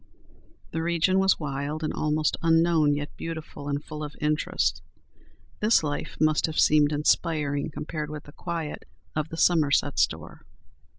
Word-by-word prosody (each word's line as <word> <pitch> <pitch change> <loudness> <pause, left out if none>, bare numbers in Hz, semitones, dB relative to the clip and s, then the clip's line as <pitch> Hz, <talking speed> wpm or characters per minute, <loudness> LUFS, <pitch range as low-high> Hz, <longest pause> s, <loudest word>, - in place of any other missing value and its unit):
The 160 - -2
region 170 +3 +2
was 190 0 +3
wild 145 +1 -3
and 155 - -1
almost 155 0 0
unknown, 165 -2 +3
yet 145 0 -5
beautiful 160 -3 -6
and 145 +1 -2
full 150 0 -6
of 150 -1 -7
interest. 150 0 0 0.8
This 215 -4 +4
life 145 -1 -4
must 155 0 +3
have 160 - -2
seemed 150 -1 +5
inspiring 150 -1 +1
compared 150 0 -5
with 150 -1 -7
the 145 - -14
quiet 165 -2 -5 0.3
of 155 0 -1
the 165 - -7
Somerset 155 -5 +3
store. - - -1
155 Hz, 145 wpm, -26 LUFS, 150-165 Hz, 0.8 s, seemed